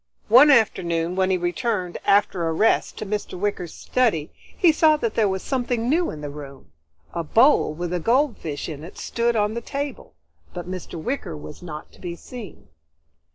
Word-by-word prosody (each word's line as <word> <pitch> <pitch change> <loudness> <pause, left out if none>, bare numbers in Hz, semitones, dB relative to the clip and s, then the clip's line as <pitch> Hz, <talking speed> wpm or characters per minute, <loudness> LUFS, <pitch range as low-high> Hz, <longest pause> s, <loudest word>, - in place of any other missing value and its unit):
One 255 +7 +8
afternoon 175 - +2
when 190 0 +2
he 190 - +2
returned, 180 +1 -2
after 195 -4 +3
a 165 - 0
rest, 215 +7 +2
to - - -5
Mr. 210 -2 -4
Wicker's 185 -3 -3
study, 215 -12 0 0.3
he 350 -4 +6
saw 310 0 +4
that 230 -6 -2
there 215 -3 +2
was 190 0 -3
something 245 -3 -1
new 335 +6 +2
in 150 - -7
the 145 -1 -5
room. 140 - -11 0.4
A 170 - -2
bowl 225 - +4
with 175 +1 -4
a 180 - 0
goldfish 230 - 0
in 150 -2 -7
it 170 - -11
stood 235 0 0
on 210 0 +1
the 235 - -3
table, 280 +2 -5 0.4
but 175 -1 -6
Mr. 180 -2 -6
Wicker 240 - -3
was 75 +1 -10
not 155 -4 -8
to - - -19
be 175 -2 -5
seen. 230 +2 -11
190 Hz, 185 wpm, -23 LUFS, 170-235 Hz, 0.4 s, One